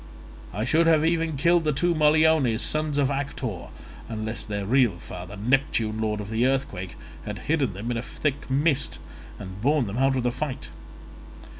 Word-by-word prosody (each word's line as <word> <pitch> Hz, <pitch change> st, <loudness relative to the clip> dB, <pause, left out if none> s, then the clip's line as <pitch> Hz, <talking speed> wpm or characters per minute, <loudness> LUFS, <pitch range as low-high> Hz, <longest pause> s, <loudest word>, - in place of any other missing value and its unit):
I 105 Hz, +4 st, -2 dB
should 165 Hz, +5 st, +3 dB
have 160 Hz, -1 st, +4 dB
even 165 Hz, -2 st, +1 dB
killed 170 Hz, +4 st, +3 dB
the 155 Hz, -, +2 dB
two 175 Hz, +5 st, +1 dB
Moliones, 155 Hz, -6 st, +4 dB
sons 155 Hz, -1 st, 0 dB
of 140 Hz, -1 st, +2 dB
Actor, 135 Hz, -7 st, -4 dB, 0.4 s
unless 110 Hz, -1 st, -4 dB
their 100 Hz, -2 st, -4 dB
real 120 Hz, -4 st, +3 dB
father, 90 Hz, +3 st, -8 dB
Neptune 110 Hz, -1 st, +1 dB
lord 105 Hz, -1 st, -1 dB
of 105 Hz, +1 st, -6 dB
the 115 Hz, +3 st, +2 dB
earthquake, 130 Hz, -9 st, -2 dB, 0.3 s
had -, -, -5 dB
hidden 140 Hz, -, +1 dB
them 105 Hz, +6 st, -4 dB
in 120 Hz, -, -1 dB
a -, -, -1 dB
thick 145 Hz, +3 st, -3 dB
mist 140 Hz, +1 st, +1 dB, 0.4 s
and 95 Hz, 0 st, -8 dB
borne 145 Hz, +1 st, +2 dB
them 105 Hz, +4 st, -4 dB
out 135 Hz, 0 st, +3 dB
of 125 Hz, -, -1 dB
the 125 Hz, -, +1 dB
fight. 130 Hz, +1 st, -4 dB
130 Hz, 175 wpm, -25 LUFS, 110-150 Hz, 0.4 s, have